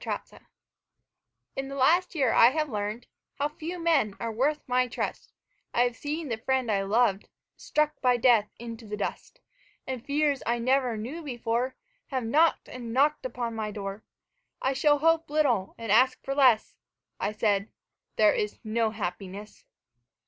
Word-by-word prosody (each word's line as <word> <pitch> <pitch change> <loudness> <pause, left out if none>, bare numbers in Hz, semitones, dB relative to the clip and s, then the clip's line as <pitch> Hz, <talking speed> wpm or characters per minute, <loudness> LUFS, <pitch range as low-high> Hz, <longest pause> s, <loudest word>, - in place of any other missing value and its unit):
Red - - -2
Maples - - -16 1.1
In 270 0 -3
the 275 - -6
last 340 +8 +3
year 265 -7 +2
I 235 - +7
have 305 +3 -1
learned 210 +2 -3 0.3
How 285 +1 -1
few 320 +4 -6
men 315 - +2
are 230 -1 -3
worth 280 +7 0
my 250 0 +2
trust; 245 - -4 0.4
I 240 - +4
have 245 -1 0
seen 300 +5 -4
the 225 -3 -3
friend 260 -1 0
I 200 -1 +1
loved 205 0 +1 0.3
Struck 300 0 -1
by 250 -2 +3
death 235 -4 +4
into 230 -1 -8
the 210 0 -4
dust, 205 - -5 0.4
And 255 -3 -5
fears 290 -1 +1
I 235 +1 +2
never 250 -1 +1
knew 255 +10 -5
before 245 -2 -2 0.3
Have 260 -3 -2
knocked 310 +8 +2
and 240 -2 -7
knocked 280 +2 +2
upon 235 -1 -4
my 220 -1 -3
door 200 0 -6 0.6
"I 265 - 0
shall 290 +2 +3
hope 330 +1 +2
little 290 -11 +1
and 230 -3 -4
ask 255 +4 +4
for 275 - -2
less," 255 -6 +4 0.5
I 200 - -1
said, 210 -1 0 0.5
"There - - +5
is 435 -4 -2
no 225 0 0
happiness." 200 0 -6
245 Hz, 165 wpm, -27 LUFS, 220-285 Hz, 1.1 s, I